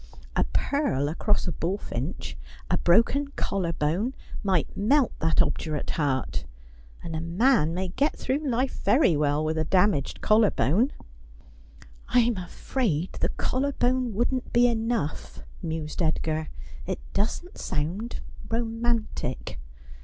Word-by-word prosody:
A - - +3
purl 280 - 0
across 205 +6 0
a - - 0
bullfinch, 165 -4 -3 0.4
a - - +4
broken 230 +10 +4
collar 185 -4 -1
bone, 170 - 0 0.3
might 190 -6 0
melt 260 +5 +3
that 160 +1 +4
obdurate 155 -3 -2
heart. 135 - -1 0.6
And 165 -1 -5
a 160 - -2
man 170 - +3
may 185 0 -2
get 275 - 0
through 265 +3 0
life 260 -3 -1
very 255 - +4
well 150 +1 +1
with 160 +1 0
a - - +2
damaged 180 -3 +2
collar 215 -1 +5
bone. 195 - +2 0.6
' - - -22
I'm 240 -1 +5
afraid 185 - -2
the - - +1
collar 280 +2 -1
bone 245 -3 +1
wouldn't 245 +3 0
be 240 +1 +5
enough,' 225 -8 -1 0.2
mused 160 -1 -3
Edgar. 160 -1 0 0.2
' - - -14
It 190 - -1 0.2
doesn't 290 - -2
sound 185 +11 -3 0.3
romantic. 230 - -2
190 Hz, 130 wpm, -27 LUFS, 155-240 Hz, 0.6 s, collar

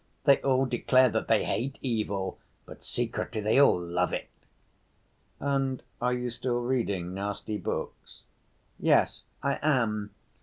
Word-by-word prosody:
They 140 -1 +5
all 135 0 +3
declare 130 +1 +4
that 110 0 -1
they 110 - +3
hate 135 +4 -2
evil, 100 -6 -2 0.3
but - - -12
secretly 110 - -2
they 110 +6 +4
all 140 - +5
love 85 0 -1
it." - - -4 1.1
"And 135 -2 -1 0.2
are 125 +1 +2
you 125 0 -2
still 120 +1 -1
reading 100 -8 -1
nasty 105 +2 -3
books?" - - -5 0.6
"Yes, - - +3 0.2
I 140 0 0
am. 115 -8 +1
120 Hz, 130 wpm, -28 LUFS, 105-130 Hz, 1.1 s, They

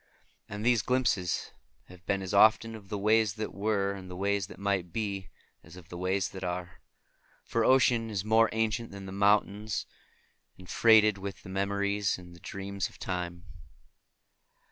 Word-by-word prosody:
And 105 +2 -5
these 120 -3 +4
glimpses 125 -8 0 0.3
have 90 -1 -16
been 100 -1 0
as 95 - -5
often 110 +2 +5
of 105 -3 -11
the 105 - -3
ways 110 0 +2
that 110 -1 -4
were 100 -1 0
and 95 -2 -9
the 90 - -7
ways 100 0 0
that - - -12
might 95 -3 -1
be, 100 -3 -3 0.3
as 80 +2 -14
of 90 -2 -14
the 90 - -7
ways 95 +1 0
that 95 -1 -8
are; 90 0 -5 0.6
for 115 - 0
ocean 120 -3 +4
is 100 -2 -3
more 110 +1 +4
ancient 110 +1 -1
than 100 -1 -9
the 95 - -7
mountains, 105 +1 +1 0.7
and 90 - -14
freighted 110 -2 +5
with 100 0 -7
the - - -10
memories 100 +1 0
and 90 -1 -13
the - - -15
dreams 100 +1 -4
of - - -18
Time. 90 -1 -4
100 Hz, 170 wpm, -29 LUFS, 95-110 Hz, 0.7 s, often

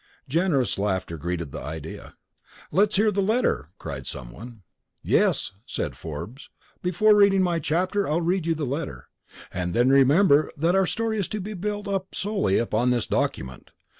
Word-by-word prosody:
Generous 150 - +1
laughter 95 -4 -1
greeted 85 -1 -4
the - - -6
idea. 80 +1 -8 0.6
"Let's 200 +6 +3
hear 210 +2 +3
the 200 - 0
letter!" 215 - +1
cried - - -7
someone. 100 - -8 0.4
"Yes," - - +2 0.2
said - - -3
Forbes, 85 - -8 0.3
"before 210 +4 +4
reading 200 -2 +5
my 175 -2 +1
chapter 185 +6 0
I'll 155 +3 +2
read 175 0 0
you 165 - +2
the 155 -1 -2
letter. 140 +4 -5 0.4
And 90 -1 -2
then 120 +3 +4
remember 145 +3 +5
that 165 +4 +2
our 190 -1 +3
story 225 +1 -1
is 195 - -1
to 215 - -4
be 210 +3 -5
built 205 +2 -4
up 195 -1 -3
solely 200 - 0
upon 120 +1 +1
this 120 -3 +1
document. 65 -1 -2
160 Hz, 165 wpm, -25 LUFS, -, 0.6 s, reading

